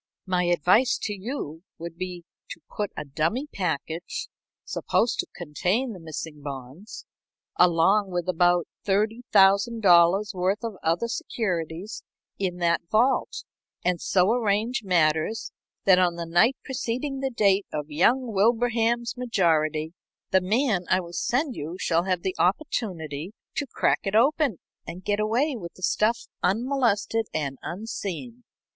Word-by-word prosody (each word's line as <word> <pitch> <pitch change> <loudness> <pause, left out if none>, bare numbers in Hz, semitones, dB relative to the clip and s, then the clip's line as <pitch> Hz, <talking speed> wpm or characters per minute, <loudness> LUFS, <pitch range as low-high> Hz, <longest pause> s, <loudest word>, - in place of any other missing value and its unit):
My 180 -2 +1
advice 180 - +3
to 210 - -1
you 190 - -5 0.2
would 170 0 -7
be 180 -1 -6 0.3
to - - -8 0.2
put 205 -1 -1
a - - -4
dummy 165 - -1
package, 175 - -3 0.4
supposed 235 - 0
to - - 0
contain 185 - -1
the 185 - -10
missing 160 -2 -7
bonds, 140 - -8 0.5
along 180 +4 +4
with 175 -1 -3
about 175 -1 +3 0.2
$30,000 200 -2 +4
worth 190 +4 0
of 225 -4 -4
other 170 +8 +1
securities 190 -4 -3 0.4
in 185 -3 -1
that 170 -1 +1
vault, 235 +5 +1 0.4
and 180 -2 +1
so 185 +2 +3
arrange 230 +2 0
matters 165 +2 +1 0.3
that 185 -2 +6
on 175 -2 +2
the 170 0 -4
night 175 +11 +3
preceding 265 +1 -3
the 270 0 -1
date 200 -5 +2
of 150 0 -4
young 230 - +2
Wilbraham's 235 +2 +2
majority, 160 - +1 0.4
the 190 - +4
man 210 -1 +1
I 185 - +4
will 175 -2 -8
send 260 - 0
you 160 +5 -5
shall 170 +1 +1
have 185 -2 -1
the 190 - -1
opportunity 180 - -1 0.2
to 290 - -2
crack - - +1
it 195 +1 -1
open 270 - +3 0.3
and 180 +2 -7
get 205 0 0
away 245 +7 +1
with 175 -7 -8
the 185 - -14
stuff 220 +5 +2 0.2
unmolested 225 0 +1
and 140 -4 -2
unseen. 225 +4 -6
195 Hz, 140 wpm, -25 LUFS, 170-230 Hz, 0.5 s, that